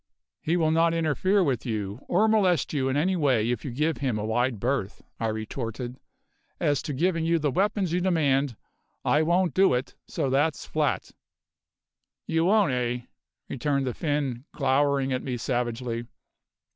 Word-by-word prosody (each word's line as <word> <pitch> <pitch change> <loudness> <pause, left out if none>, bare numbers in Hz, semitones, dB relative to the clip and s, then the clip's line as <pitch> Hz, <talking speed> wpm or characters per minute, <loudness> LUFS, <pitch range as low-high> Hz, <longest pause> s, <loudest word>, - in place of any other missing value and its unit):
"He 165 +3 +1
will 160 -2 +2
not 165 +1 +3
interfere 175 +5 +2
with 135 -8 0
you, 105 -2 -3
or 205 +5 +3
molest 190 -10 +2
you 135 -3 0
in 135 - 0
any 185 +6 +2
way 130 -8 +2
if 120 - -3
you - - -4
give 150 +6 0
him 130 -6 -1
a 105 - -3
wide 120 +1 0
berth," 120 -3 -2 0.2
I 115 - 0
retorted. 115 +3 -4 0.6
"As 145 -3 +1
to 145 - -4
giving 165 +4 +1
you 165 +1 +2
the 150 -3 0
weapons 195 - 0
you 180 - +1
demand, 145 -8 +1 0.5
I 150 - +3
won't 175 +2 +2
do 190 -8 +4
it, 125 +2 -3
so 135 - -2
that's 145 +3 +1
flat." - - -1 1.1
"You 165 +1 +1
won't, 205 -4 +4
eh?" 125 -1 -1 0.5
returned 140 +1 -1
the 125 - -2
Finn, 145 -5 -2
glowering 135 -1 +1
at 130 - -1
me 125 -2 -3
savagely. 120 -1 -2
140 Hz, 165 wpm, -26 LUFS, 125-165 Hz, 1.1 s, do